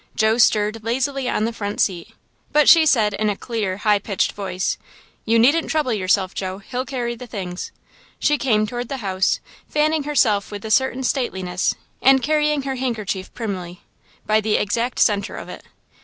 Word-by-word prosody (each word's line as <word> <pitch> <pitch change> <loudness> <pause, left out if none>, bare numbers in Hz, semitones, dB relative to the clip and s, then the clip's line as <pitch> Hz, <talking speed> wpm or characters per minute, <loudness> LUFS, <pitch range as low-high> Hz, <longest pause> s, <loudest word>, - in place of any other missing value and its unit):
Joe 220 +1 +2
stirred 215 -1 +3
lazily 260 +3 -1
on 215 - 0
the 230 - -2
front 205 -2 -4
seat, 175 -4 -1 0.4
but 300 -1 +4
she 325 -2 +7
said, 215 -7 +3
in 215 +1 0
a 205 - -1
clear, 210 -4 -3
high 210 0 +2
pitched 200 -2 -1
voice: 185 -2 -3 0.5
"You 225 +1 +3
needn't 285 +8 +4
trouble 300 -6 +1
yourself, 190 -1 +1
Joe. 190 -1 -4
He'll 250 +6 -5
carry 245 -3 -2
the 245 +1 -9
things." 185 -5 -6 0.5
She 295 -1 +1
came 215 -5 +2
toward 240 +2 -5
the 275 - -3
house, 190 0 +1 0.3
fanning 300 0 +1
herself 220 -9 +2
with 205 0 -7
a 220 - -4
certain 265 +1 +2
stateliness, 190 -9 -1 0.3
and 265 0 +5
carrying 300 -1 +1
her 265 -1 -3
handkerchief 215 -7 -3
primly, 185 -6 -5 0.4
by 215 0 +3
the 215 0 +1
exact 235 +4 -1
centre 200 -2 +1
of - - -8
it. - - -8
220 Hz, 175 wpm, -21 LUFS, 200-265 Hz, 0.5 s, she